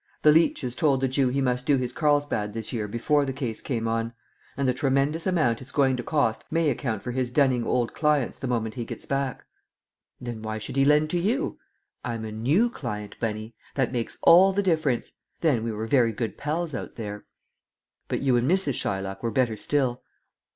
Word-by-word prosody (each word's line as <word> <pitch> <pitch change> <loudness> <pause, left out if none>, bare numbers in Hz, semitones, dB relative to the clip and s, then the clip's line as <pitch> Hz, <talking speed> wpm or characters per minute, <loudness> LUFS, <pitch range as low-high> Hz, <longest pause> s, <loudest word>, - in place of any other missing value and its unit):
The 150 - +8
leeches 150 -5 +2
told 145 -5 +2
the 135 - +1
Jew 130 0 +1
he 135 +2 0
must 125 0 0
do 145 - +4
his 125 -1 -2
Carlsbad 145 -9 +1
this 115 +1 -5
year 110 -3 -2
before 145 +7 +1
the 135 - -2
case 130 -5 -4
came 115 -4 -2
on; 115 +1 -1 0.4
and 140 -1 0
the 125 - +3
tremendous 140 +5 0
amount 155 -11 +1
it's 130 0 -9
going 135 -2 +3
to 125 - -3
cost 125 -5 0
may 165 -2 +2
account 110 -8 -3
for 125 - -3
his 125 0 -1
dunning 125 -2 +2
old 120 -2 0
clients 150 -5 +1
the 135 - -3
moment 115 -3 -1
he 120 - -4
gets - - -8
back." 135 -3 -2 0.7
"Then 120 -3 -6
why 110 0 -4
should 110 - -6
he 135 0 +4
lend 150 +1 +4
to 175 - +1
you?" 245 - -1 0.4
"I'm 115 -2 -4
a 110 - -5
new 145 - +2
client, 105 - -6
Bunny; 110 0 -3 0.2
that 130 -4 +1
makes 120 -3 -3
all 185 +3 +8
the 200 +1 +1
difference. 155 -9 0 0.3
Then 140 -9 +2
we 115 - -2
were 110 +1 -4
very 115 -1 +3
good 115 +1 -3
pals 155 +2 -2
out 125 - -6
there." 105 -2 -6 0.8
"But - - -2
you 130 -3 +3
and 120 +3 +1
Mrs. 185 -6 +2
Shylock 95 0 -3
were 115 - -1
better 115 -1 +1
still?" 125 +2 0
130 Hz, 205 wpm, -26 LUFS, 115-145 Hz, 0.8 s, The